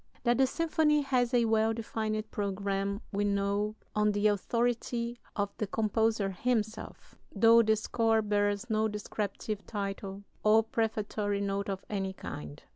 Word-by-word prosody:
That 240 0 +2
the 265 - +5
symphony 305 -1 +2
has 250 -3 +1
a 240 -2 +3
well 220 0 +2
defined 220 -1 -3
programme 200 0 -2
we 205 0 0
know 200 +1 0 0.2
on 210 0 +3
the 205 +1 0
authority 235 +3 -1 0.2
of 205 -1 -2
the 215 - -2
composer 220 -1 +1
himself, 220 +2 -2 0.2
though 230 +3 +7
the 220 -1 +3
score 225 0 +1
bears 205 -1 0
no 220 -1 +1
descriptive 210 0 -4
title 200 -1 -4 0.2
or 220 +1 +5
prefatory 215 -2 -1
note 200 0 -2
of 195 -1 -4
any 195 -2 -2
kind. 75 - -8
215 Hz, 140 wpm, -30 LUFS, 200-225 Hz, 0.2 s, though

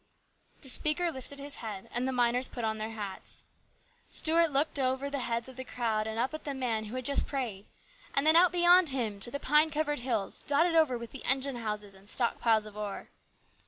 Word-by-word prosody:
* - - -35
The - - 0
speaker 305 +6 +2
lifted 280 0 -3
his 285 +1 -1
head 210 -4 -6
and 245 +2 0
the - - 0
miners 245 0 +2
put 240 - -7
on 220 -1 -1
their 215 +1 -3
hats. 210 -4 -7 0.7
Stuart 330 +1 +3
looked 285 +1 0
out 255 -1 +2
over 275 +2 -5
the 280 - -2
heads 235 -1 -1
of 260 -1 -12
the 260 - -4
crowd 225 -4 -2
and 220 0 -4
up 255 +5 0
at 310 - -6
the 285 -2 -4
man 230 -4 -1
who 215 +4 -7
had 255 -1 -4
just 280 +1 +2
prayed, 230 -8 -4 0.5
and 275 - +2
then 315 +1 +6
out 345 +1 +6
beyond 350 -1 +5
him 230 -7 -2
to 200 - -4
the 280 - -4
pine 300 +3 +3
covered 295 -1 -1
hills 235 -5 -1
dotted 325 +4 +2
over 310 -7 +3
with 235 -1 -9
the 270 - -9
engine 265 0 0
houses 210 -3 -4
and 195 +1 -9
stock 235 0 +1
piles 220 -2 +3
of 210 -1 -11
ore. 210 -2 -6
255 Hz, 230 wpm, -30 LUFS, 220-285 Hz, 0.7 s, then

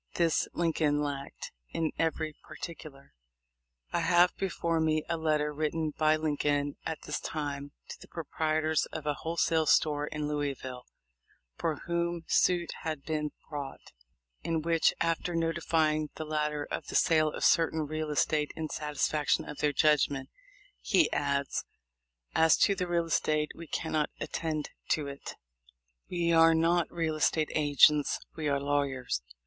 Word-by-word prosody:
This 170 -2 +2
Lincoln 160 -3 +1
lacked 140 -1 -5 0.2
in 160 -2 -1
every 160 -1 0
particular. 150 -5 -9 0.8
I - - +2
have 175 0 +4
before 170 -3 -1
me 155 -1 +1
a 170 - 0
letter 155 -2 0
written 155 +1 -1
by 155 0 +3
Lincoln 145 -2 0
at 160 -2 -5
this 150 - -3
time 145 -2 -4 0.2
to - - -8
the - - -12
proprietors 155 -1 0
of 155 -2 -7
a 150 - +1
wholesale 160 0 0
store 150 -1 +3
in 150 -1 -3
Louisville, 135 -4 -3 0.7
for 155 -3 -2
whom 170 0 -1
suit 175 -2 +2
had 155 -3 -4
been 150 -1 -2 0.2
brought, 145 -3 -7 0.5
in 160 -2 -1
which, 165 0 +3
after 165 +1 0
notify 165 -1 +1
ing 155 0 -2
the 155 - -5
latter 150 -1 -1
of - - -4
the - - -6
sale 155 -2 +4
of - - -2
certain 160 -1 +3
real 155 +1 -3
estate 150 0 +1
in 160 -1 -4
satisfaction 150 0 0
of 150 - -8
their 150 - +2
judgment, 145 -2 +2 0.5
he 330 - +3
adds: 140 -1 0 0.7
"As 160 0 +5
to 200 - +2
the 180 -2 -2
real 170 -1 +1
estate 155 -2 +1
we 170 - -10
cannot 155 -1 -1
attend 155 -2 -3 0.2
to 150 - +1
it. 140 0 -7 0.7
We 170 -1 +1
are 165 0 +6
not 170 +1 +2
real 165 -2 -1
estate 155 0 +1
agents, 145 0 +4 0.2
we 155 -2 -3
are 140 -1 +1
lawyers. 140 - -1
155 Hz, 150 wpm, -30 LUFS, 150-165 Hz, 0.8 s, are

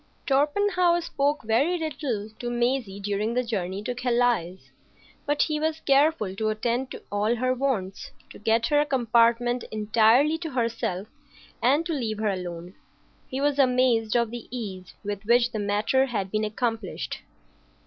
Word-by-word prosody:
Torpenhow 345 +5 +2
spoke 290 -3 -1
very 260 +11 +2
little 280 -9 -3
to 240 - -3
Maisie 240 -4 -1
during 205 +3 -2
the 250 - +2
journey 195 -4 -3
to 245 - -2
Calais; 240 -7 +1 0.7
but 290 0 +2
he 305 -1 -1
was 315 +1 -1
careful 275 -7 +2
to 215 0 0
attend 235 +4 -1
to - - -9
all 210 +3 +1
her 255 +2 +1
wants, 245 -8 -2 0.2
to - - -12
get 225 +2 +2
her 295 -1 +3
a - - +1
compartment 240 -1 +2
entirely 225 +8 +3
to 330 -2 -4
herself, 230 -7 -2 0.5
and 280 +7 +3
to 335 - -2
leave 230 -7 -2
her 215 0 0
alone. 175 -1 -6 0.5
He 260 - -4
was 285 0 +1
amazed 250 -4 +3
of 235 -2 +2
the 240 -1 -7
ease 195 -7 -7
with 205 -1 -4
which 240 +2 +4
the 220 - -3
matter 210 +6 +1
had 200 -6 -3
been 215 0 0
accomplished. 225 +1 -3
240 Hz, 160 wpm, -26 LUFS, 215-270 Hz, 0.7 s, which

